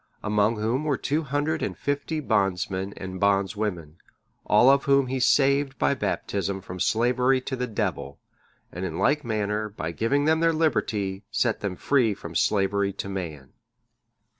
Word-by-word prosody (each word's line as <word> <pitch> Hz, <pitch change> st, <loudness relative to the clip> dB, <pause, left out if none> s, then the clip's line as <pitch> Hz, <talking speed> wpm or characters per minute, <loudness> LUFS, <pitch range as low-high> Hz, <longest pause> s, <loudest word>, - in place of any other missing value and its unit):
Among 105 Hz, +1 st, +2 dB
whom 115 Hz, +7 st, 0 dB
were 145 Hz, -4 st, 0 dB
two 150 Hz, +4 st, -1 dB
hundred 150 Hz, +2 st, -1 dB
and -, -, -3 dB
fifty 145 Hz, +2 st, -2 dB
bondsmen 95 Hz, -, 0 dB
and 95 Hz, -1 st, -6 dB
bondswomen, 100 Hz, -5 st, 0 dB, 0.5 s
all 120 Hz, +6 st, +6 dB
of 140 Hz, 0 st, +2 dB
whom 140 Hz, -1 st, +4 dB
he 130 Hz, +1 st, -2 dB
saved 140 Hz, +1 st, +3 dB
by -, -, +2 dB
Baptism 100 Hz, -6 st, -2 dB
from 90 Hz, 0 st, -8 dB
slavery 125 Hz, +6 st, +2 dB
to 130 Hz, -, -4 dB
the 125 Hz, 0 st, -3 dB
Devil, 105 Hz, -, -3 dB, 0.5 s
and 90 Hz, -, -6 dB
in 85 Hz, -3 st, -4 dB
like 150 Hz, +1 st, +2 dB
manner, 105 Hz, -2 st, -2 dB
by 85 Hz, -5 st, -5 dB
giving 135 Hz, -, 0 dB
them 160 Hz, +1 st, +3 dB
their 165 Hz, 0 st, +3 dB
liberty, 105 Hz, -11 st, 0 dB
set -, -, 0 dB
them 100 Hz, -3 st, -3 dB
free 120 Hz, -2 st, +2 dB
from 85 Hz, -2 st, -9 dB
slavery 100 Hz, +2 st, +1 dB
to 100 Hz, -, -6 dB
man. 80 Hz, -8 st, -6 dB
110 Hz, 160 wpm, -25 LUFS, 95-140 Hz, 0.5 s, all